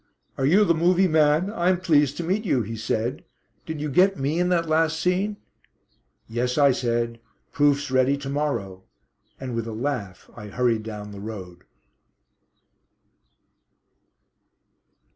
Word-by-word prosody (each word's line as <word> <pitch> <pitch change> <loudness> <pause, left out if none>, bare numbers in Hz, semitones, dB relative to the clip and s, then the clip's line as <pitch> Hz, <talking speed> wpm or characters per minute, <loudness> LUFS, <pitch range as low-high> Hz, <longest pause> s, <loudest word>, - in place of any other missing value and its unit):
"Are 135 - 0
you 200 +7 +5
the 170 - +3
'movie' 180 +3 +3
man? 155 +4 +2
I'm 180 -2 +1
pleased 145 -6 +2
to 175 - -3
meet 190 +6 -1
you," 135 - +1
he 115 +2 -6
said. 110 +2 -2 0.4
"Did 160 -1 -4
you 150 - -2
get 185 +7 +3
me 145 +4 -1
in 180 0 +1
that 170 -2 +1
last 160 0 +1
scene?" 190 +4 0 0.9
"Yes," 125 +3 -2
I 140 -2 +5
said. 120 -2 -1 0.3
"Proofs 145 -1 +1
ready 130 +2 +3
to 140 -1 -7
morrow." 140 -11 -2 0.6
And 130 -2 -5
with 115 -1 -3
a 115 - -5
laugh 110 -6 -4
I 105 - -9
hurried 115 +1 0
down 105 -1 -7
the 100 - -9
road. 95 -5 -8
140 Hz, 145 wpm, -24 LUFS, 115-165 Hz, 0.9 s, you